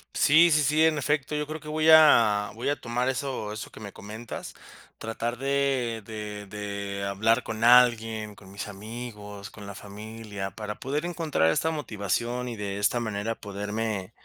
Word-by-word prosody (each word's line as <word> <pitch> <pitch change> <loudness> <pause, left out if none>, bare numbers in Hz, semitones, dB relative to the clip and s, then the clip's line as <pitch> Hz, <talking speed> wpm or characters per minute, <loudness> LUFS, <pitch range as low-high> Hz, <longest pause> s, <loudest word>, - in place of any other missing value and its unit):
Sí, 165 +3 +6
sí, 150 0 +5
sí, 155 +3 +3
en 155 -1 +3
efecto, 145 +1 0
yo 150 0 -2
creo 155 +1 -5
que 150 - -9
voy 155 +1 +2
a 115 -10 +7
voy 115 +3 -4
a 145 - +2
tomar 120 +2 -1
eso 130 -5 -3
eso 110 - -7
que - - -12
me 100 -2 -8
comentas. 110 +3 -8 0.4
Tratar 115 +2 -3
de 135 -4 0
de 105 -1 -6
de 100 -1 -4
hablar 110 +4 +2
con 110 0 -4
alguien, 115 -3 +4
con 95 -1 -15
mis 100 - -6
amigos, 105 -1 -8
con 105 0 -11
la 100 - -6
familia, 105 -1 -7
para 105 +2 -5
poder 145 +5 -3
encontrar 160 - +1
esta 160 - +1
motivación 120 - -2
y 115 - -6
de 100 -1 -3
esta 105 +4 +2
manera 110 0 -2
poderme 105 0 -3
110 Hz, 175 wpm, -27 LUFS, 105-130 Hz, 0.4 s, a